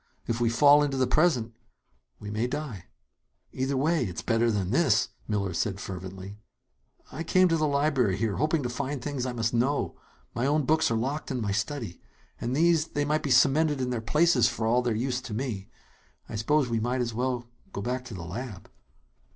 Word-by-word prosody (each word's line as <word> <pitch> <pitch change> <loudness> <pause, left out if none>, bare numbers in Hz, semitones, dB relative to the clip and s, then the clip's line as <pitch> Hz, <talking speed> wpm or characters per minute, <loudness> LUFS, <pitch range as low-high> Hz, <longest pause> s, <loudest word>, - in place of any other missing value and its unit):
If 115 +1 -2
we 115 - +3
fall 145 +5 +6
into 140 -2 0
the 130 - +3
present 125 -4 +2 0.7
we 105 0 -7
may 110 +3 0
die." 125 - -5 0.7
"Either 135 +1 -1
way, 155 +2 +2
it's 90 -7 -5
better 115 0 +2
than 100 -4 -1
this!" 130 -6 +3 0.2
Miller 100 -4 -1
said 95 +3 -1
fervently. 95 +1 -7 0.7
"I 155 - -6
came 185 +3 +4
to 165 - +3
the 155 -1 +1
library 140 -8 +1
here, 110 -1 -1
hoping 155 +1 +1
to - - -1
find 125 +3 -3
out 135 - -7
the - - -11
things 130 -3 -2
I 125 - -3
must 115 -1 -1
know. 130 +5 0 0.4
My 120 +3 0
own 150 +1 +2
books 160 +3 +3
are 115 - +1
locked 135 +7 -3
in 130 - -2
my 105 -3 -1
study. 105 -1 -3 0.4
And 125 +2 -2
these 165 0 +3
they 145 -2 -1
might 150 +1 +1
be 145 - -3
cemented 145 +3 +4
in 125 -1 -1
their 120 -2 -2
places, 150 0 +3
for 110 - -3
all 120 +3 +3
their 120 -3 0
use 125 +2 -1
to 115 -4 -6
me. 110 -6 -4 0.6
I - - -7
suppose 135 +6 +2
we 115 -1 0
might 125 +3 -1
as 120 -1 -2
well 125 0 -2 0.2
go 100 - -5
back 125 +2 -2
to 115 - -8
the 90 - -6
lab." 105 +2 -7
125 Hz, 210 wpm, -27 LUFS, 110-145 Hz, 0.7 s, fall